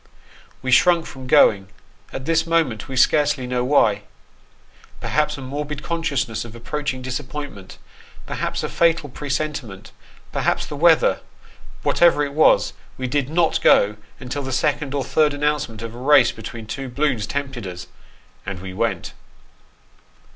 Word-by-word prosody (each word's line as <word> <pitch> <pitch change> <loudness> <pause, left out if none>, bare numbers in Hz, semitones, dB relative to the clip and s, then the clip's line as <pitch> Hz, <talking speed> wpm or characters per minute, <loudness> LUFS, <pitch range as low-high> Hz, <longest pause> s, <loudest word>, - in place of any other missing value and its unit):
We 130 - -1
shrunk 170 +5 +5
from 130 -1 -9
going; 100 -6 +5 0.4
at 130 - -6
this 165 +1 +1
moment 160 -11 0
we 135 - -6
scarcely 140 0 +3
know 125 0 -1
why. 110 -6 +3 1.0
Perhaps 150 0 0
a - - -8
morbid 145 +2 -5
consciousness 145 -8 -2
of 115 -1 -11
approaching 130 +2 -4
disappointment 130 -5 -6 0.5
perhaps - - -3
a - - -2
fatal 165 -3 +2
presentiment 135 -7 -4 0.4
perhaps - - 0
the - - -7
weather; 165 +2 +4 0.6
whatever 165 -4 +4
it 140 - -7
was, 155 +2 +4 0.2
we 130 - -4
did 140 +1 -1
not 165 0 +1
go 105 +1 +4 0.2
until 130 +3 -4
the 130 -1 -5
second 145 +1 0
or 140 - 0
third 150 +2 +2
announcement 145 -7 -1
of 115 0 -6
a 120 - -10
race 145 +4 +5
between 115 -2 -8
two 130 +4 -5
balloons 130 -4 0
tempted 135 -7 -4
us, 90 -1 -7 0.6
and 95 -2 -6
we 95 0 -7
went. - - -2
135 Hz, 145 wpm, -21 LUFS, 120-150 Hz, 1.0 s, shrunk